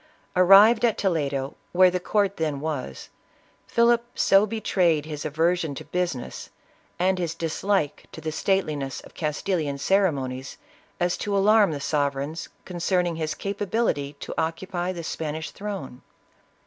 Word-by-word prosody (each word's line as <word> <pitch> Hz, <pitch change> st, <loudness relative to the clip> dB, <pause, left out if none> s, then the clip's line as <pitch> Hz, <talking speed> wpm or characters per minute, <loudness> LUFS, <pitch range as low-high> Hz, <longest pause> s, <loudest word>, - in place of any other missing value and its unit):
Arrived 195 Hz, +6 st, +7 dB
at 230 Hz, -3 st, +3 dB
Toledo, 140 Hz, -7 st, -1 dB, 0.2 s
where 185 Hz, 0 st, +6 dB
the 180 Hz, -, -1 dB
court 200 Hz, +1 st, 0 dB
then 155 Hz, -3 st, -1 dB
was, 140 Hz, -, -5 dB, 0.6 s
Philip 235 Hz, 0 st, +3 dB
so 195 Hz, +2 st, +4 dB
betrayed 180 Hz, -8 st, +1 dB
his 150 Hz, -2 st, -6 dB
aversion 160 Hz, 0 st, 0 dB
to -, -, -8 dB
business, 175 Hz, -9 st, -3 dB, 0.5 s
and 185 Hz, +1 st, +1 dB
his 165 Hz, -2 st, -2 dB
dislike 165 Hz, 0 st, -1 dB
to -, -, -9 dB
the 160 Hz, 0 st, -4 dB
stateli 190 Hz, -1 st, 0 dB
ness 135 Hz, -3 st, -5 dB
of -, -, -15 dB
Castilian 150 Hz, -1 st, -2 dB
ceremonies, 140 Hz, -7 st, 0 dB, 0.4 s
as 175 Hz, 0 st, +1 dB
to 200 Hz, -1 st, -1 dB
alarm 210 Hz, +1 st, +5 dB
the 150 Hz, -3 st, -3 dB
sovereigns 145 Hz, +2 st, -2 dB, 0.2 s
concerning 175 Hz, -1 st, 0 dB
his 155 Hz, -1 st, -2 dB
capability 200 Hz, -7 st, -1 dB
to -, -, -5 dB
occupy 175 Hz, +2 st, -2 dB
the 170 Hz, -2 st, -6 dB
Spanish 160 Hz, 0 st, -4 dB
throne. 195 Hz, -11 st, -6 dB
170 Hz, 135 wpm, -25 LUFS, 150-195 Hz, 0.6 s, Arrived